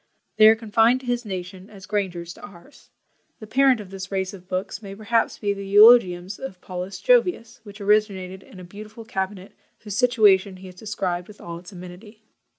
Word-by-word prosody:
They 215 0 +8
are 220 - +7
confined 225 +3 +2
to - - -13
his 245 -1 -2
nation, 185 0 -7
as 195 -2 -13
Granger's 180 -5 -3
to - - -17
ours. 200 +8 -15 0.5
The 215 - -9
parent 260 +2 +3
of 195 -3 -10
this 195 0 -8
race 190 0 -2
of 185 -2 -13
books 185 +2 -4
may 195 -2 -9
perhaps 225 +2 0
be 205 -1 -1
the 200 0 -7
Eulogiums 200 -3 +5
of 180 +1 -8
Paulus 185 +1 -7
Jovius, 370 - +1
which 205 -1 -13
originated 200 -2 0
in 190 - -15
a - - -10
beautiful 215 +5 -11
CABINET, 190 -3 -5 0.3
whose 210 -3 -6
situation 210 -6 +3
he 190 - -13
has 185 - -10
described 180 -3 -4
with 210 - -15
all 170 0 -8
its 180 +3 -14
amenity. 190 +4 -12
200 Hz, 190 wpm, -23 LUFS, 185-220 Hz, 0.5 s, They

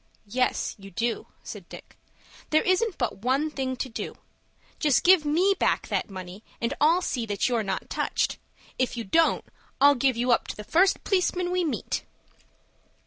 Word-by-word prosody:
"Yes 250 +5 0
you 195 0 -11
do," 230 +5 -2 0.2
said - - -9
Dick. - - -12 0.5
"There 310 - +3
isn't 370 +2 +1
but 240 -6 -1
one 270 +7 0
thing 265 -3 -2
to 260 - -3
do. 230 - -6 0.6
Just 295 -5 +3
give 360 -3 +6
me 350 +7 +3
back - - +1
that - - -1
money, 185 +1 -9 0.2
and 235 +3 -1
I'll 335 +5 +4
see 240 -8 -2
that 205 -1 0
you're 240 -3 +1
not 195 -3 -3
touched. - - -1 0.4
If 255 -1 0
you 230 - -2
don't, 320 +11 +2 0.3
I'll 285 +1 +7
give 260 -2 +1
you 245 +1 +1
up 235 - +2
to - - -5
the 210 - -8
first 365 - +3
p'liceman 360 -2 0
we 365 0 +1
meet." 310 - -2
265 Hz, 175 wpm, -26 LUFS, 230-330 Hz, 0.6 s, I'll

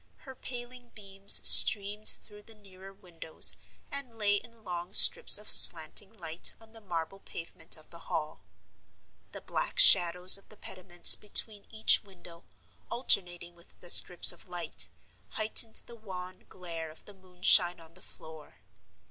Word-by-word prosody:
Her 265 - -16
paling 245 -1 -14
beams 195 -1 +2
streamed 210 +1 +5
through 210 0 -12
the 225 +1 -17
nearer 195 -2 -19
windows, 170 -4 -3 0.4
and 265 -5 -9
lay 205 -1 -4
in 230 +1 -17
long 175 0 -11
strips 480 - +6
of - - -13
slanting 200 - +3
light 165 -2 -2
on 225 -1 -23
the 225 - -19
marble 175 -1 -10
pavement 165 -3 -6
of 155 - -21
the 170 - -15
Hall. 155 -1 -9 0.9
The - - -12
black - - -8
shadows 180 - +4
of - - -27
the 215 - -18
pediments 180 -2 +2
between 210 0 -7
each 220 0 +1
window, 175 -4 -18 0.4
alternating 175 -7 -1
with 170 0 -26
the 175 - -6
strips 180 -1 +2
of 175 +1 -18
light, 175 -3 -6 0.4
heightened 220 +1 -3
the 235 - -16
wan 185 -4 -14
glare 165 -3 -11
of 155 - -19
the 205 - -16
moonshine 180 -1 -1
on 165 0 -20
the 185 - -16
floor. 160 -4 -12
190 Hz, 150 wpm, -25 LUFS, 175-215 Hz, 0.9 s, strips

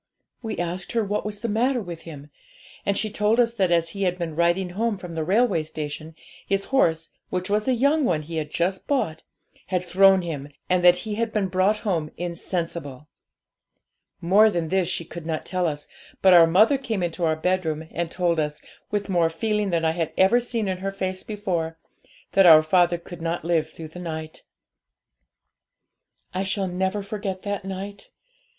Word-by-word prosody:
We 220 -3 -4
asked 175 +2 -4
her 230 -1 +2
what 205 +1 -2
was 205 -1 -7
the 235 - -2
matter 245 +4 +1
with 175 -6 -7
him, 145 -1 -11 0.6
and 200 -1 +2
she 215 0 -1
told 210 +3 +2
us 230 -1 +3
that 195 -6 +1
as 170 -1 +2
he 200 +4 -7
had 180 -2 +1
been 165 -3 -4
riding 175 +2 +2
home 220 +3 -1
from 180 -2 -8
the 160 -1 -2
railway 195 0 +2
station, 155 +1 -6 0.3
his 195 0 0
horse, 165 -11 +2 0.2
which 185 +2 -3
was 210 +3 +1
a 260 - +3
young 285 +5 +3
one 165 - +1
he 165 +2 -6
had 150 -1 -3
just 180 +4 -1
bought, 160 - 0 0.5
had 180 -1 -1
thrown 190 +1 +5
him, 145 -4 -5 0.2
and 180 -1 +2
that 175 0 +8
he 215 - -3
had 230 -1 0
been 205 -3 0
brought 190 +3 +2
home 165 -7 0
insensible. 170 -4 -4 1.1
More 200 +6 +5
than 170 -5 -2
this 190 -1 +1
she 170 - -2
could 165 0 -9
not 160 -1 -3
tell 180 -1 0
us, 150 -2 -4 0.4
but 190 -1 +7
our 170 -2 +8
mother 215 - +4
came 220 -8 -2
into 175 +1 -3
our 160 -1 +2
bedroom, 160 -2 -1
and 170 0 -2
told 170 -2 0
us, 150 -1 -2 0.3
with 205 -1 -2
more 175 -4 +2
feeling 210 +4 -1
than 165 -2 0
I 160 - +3
had 165 -1 -2
ever 195 +6 +5
seen 235 -3 -3
in 185 -1 -2
her 195 +1 -3
face 185 -1 -3
before, 180 -7 -3 0.5
that 195 -2 +6
our 155 -2 +9
father 175 +1 +3
could 175 0 -11
not 165 0 -2
live 165 -2 +1
through 160 -1 -9
the 180 - -10
night. 160 -2 -6 1.9
'I 185 - -1
shall 195 0 -1
never 190 +3 -1
forget 195 -2 -5
that 205 -1 -3
night. 195 +1 -7
180 Hz, 190 wpm, -24 LUFS, 165-200 Hz, 1.9 s, our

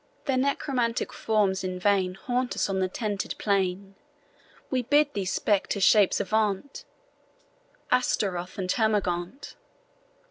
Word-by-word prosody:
Their 270 -3 +1
necromantic 255 -3 -1
forms 205 -4 0
in 185 0 -3
vain 185 -1 +1
Haunt 250 +4 -2
us - - 0
on 190 - -1
the 185 - +1
tented 205 0 -3
plain; 195 -1 -1 0.8
We 260 -2 +1
bid 290 +4 +2
these 190 -2 -2
spectre 205 0 0
shapes 200 0 +4
avaunt, 220 - -1 1.1
Ashtaroth 195 -8 0
and 190 -2 -3
Termagaunt. 205 0 -1
205 Hz, 115 wpm, -26 LUFS, 190-245 Hz, 1.1 s, shapes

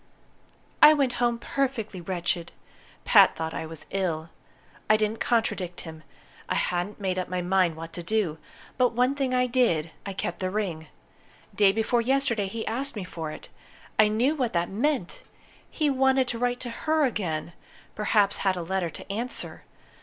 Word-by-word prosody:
"I 305 - +10
went 270 -4 +1
home 240 -1 +2
perfectly 235 -7 -2
wretched. 175 -1 -2 0.5
Pat - - +6
thought 160 0 -4
I 160 - -4
was 160 -1 -7
ill. 170 -4 -2 0.6
I 215 - +6
didn't 215 +1 -1
contradict 200 -7 0
him. 160 -2 -9 0.5
I - - +1
hadn't 180 +4 -1
made 185 -2 -1
up 185 - -4
my 180 -1 -2
mind 180 -2 +2
what 165 +1 -8
to 175 - -4
do. 175 -4 -1 0.4
But 250 -2 +3
one 250 +3 +2
thing 275 -2 -1
I 250 0 +3
did 235 -11 +1
I 200 - -5
kept 175 -2 -3
the 185 - -1
ring. 185 -6 -3 0.7
Day 200 -2 +5
before 225 +3 +1
yesterday 240 -5 +1
he 220 +3 -5
asked 265 +3 0
me 205 - -4
for 165 -3 -6
it. - - -9 0.5
I 215 - +7
knew 235 +7 +2
what 255 -7 -1
that 170 0 0
meant! 235 - -1 0.5
He 300 -3 0
wanted 265 -1 +3
to 235 - -3
write 245 0 0
to 245 - -5
her 310 +6 +1
again 175 -9 -2 0.4
perhaps 210 -1 +2
had 190 -2 +1
a 175 - -3
letter 185 0 -1
to 165 - -9
answer. 235 +6 -3
210 Hz, 175 wpm, -26 LUFS, 175-245 Hz, 0.7 s, I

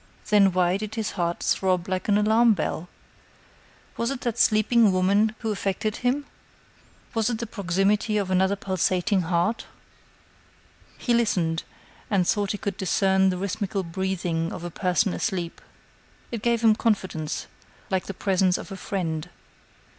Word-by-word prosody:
Then 200 -2 +6
why 180 0 +2
did 215 +1 -6
his 220 -3 -2
heart 170 -1 -2
throb 185 -1 +1
like 185 -1 -2
an 205 - +4
alarm 220 +2 +4
bell? 170 0 -3 1.1
Was 235 - 0
it 275 -2 -4
that 235 -1 -2
sleeping 215 0 +4
woman 200 +4 +2
who 225 -2 -1
affected 200 +1 -2
him? 260 +4 0 0.9
Was 225 -1 +1
it 235 - -1
the 235 - -4
proximity 200 +1 0
of 195 -2 -1
another 190 +2 +3
pulsating 190 +1 0
heart? 175 +6 0 1.3
He 245 - 0
listened, 175 -9 +1 0.5
and 190 -4 +2
thought 205 -2 +1
he 205 - -3
could 200 -1 -4
discern 190 0 +2
the 180 - -1
rhythmical 195 +1 -2
breathing 170 -2 -2
of 175 - -7
a 175 - -5
person 185 +2 +1
asleep. 180 -6 -3 0.7
It 230 -3 -4
gave 235 0 +1
him 225 -2 +6
confidence, 190 -9 -1 0.5
like 190 -2 0
the 195 - -5
presence 185 -2 +2
of - - -9
a 195 - -6
friend. 165 -5 -3
195 Hz, 150 wpm, -25 LUFS, 180-215 Hz, 1.3 s, Then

